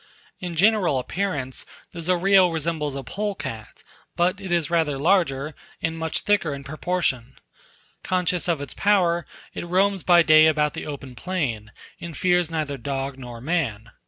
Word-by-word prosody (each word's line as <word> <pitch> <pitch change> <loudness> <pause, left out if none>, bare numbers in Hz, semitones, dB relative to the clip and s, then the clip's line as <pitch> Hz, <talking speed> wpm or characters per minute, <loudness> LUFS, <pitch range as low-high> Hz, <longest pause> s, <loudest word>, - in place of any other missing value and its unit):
In 175 -2 -5
general 195 -4 +3
appearance, 140 -2 -2 0.3
the 170 - -7
Zorillo 185 +1 +4
resembles 160 -3 -2
a 135 - -5
polecat, 145 - -5 0.3
but 185 +3 +1
it 190 -2 -6
is 170 -3 +1
rather 160 -5 +1
larger, 150 -3 +1 0.3
and 160 0 -2
much 160 0 -2
thicker 195 -8 +1
in 140 - -9
proportion. 140 -4 -2 0.7
Conscious 180 -2 0
of 165 -5 0
its 145 - -6
power, 180 -4 +2 0.3
it - - -5
roams 190 +2 +1
by 175 -1 +5
day 155 0 +7
about 150 -1 +2
the - - -6
open 140 -3 -7
plain, 125 - -3 0.3
and 170 -3 -7
fears 175 -2 +2
neither 150 -4 -3
dog 135 +1 -4
nor 120 -2 -8
man. 125 -8 -2
160 Hz, 155 wpm, -24 LUFS, 140-180 Hz, 0.7 s, day